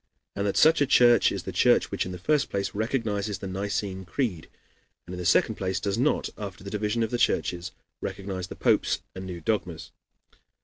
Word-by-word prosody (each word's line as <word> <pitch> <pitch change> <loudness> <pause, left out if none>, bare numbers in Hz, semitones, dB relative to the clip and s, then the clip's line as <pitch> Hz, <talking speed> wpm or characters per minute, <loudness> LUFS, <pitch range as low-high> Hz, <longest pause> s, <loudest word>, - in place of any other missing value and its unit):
and 100 +1 -1
that 100 - -1
such 160 0 +5
a 145 - +4
church 120 -2 +5
is - - -4
the - - -5
church - - +3
which, - - -1
in - - -5
the 90 - -6
first 150 - +1
place, 100 0 -2
recognizes 105 -3 -1
the 95 - -8
Nicene 95 0 -3
Creed, 95 - -3 0.6
and 90 - -8
in 90 - -6
the 90 - -1
second - - +3
place 95 -1 -1
does 100 +1 -1
not, 130 +6 +1
after 100 -2 -7
the 100 - -7
division 105 +2 0
of 110 - -2
the 120 - -1
churches, 90 -5 0 0.3
recognize 95 -2 -4
the - - -8
popes - - +2
and 95 0 -7
new 90 -2 -6
dogmas. 90 -4 -2
100 Hz, 205 wpm, -26 LUFS, 95-110 Hz, 0.6 s, such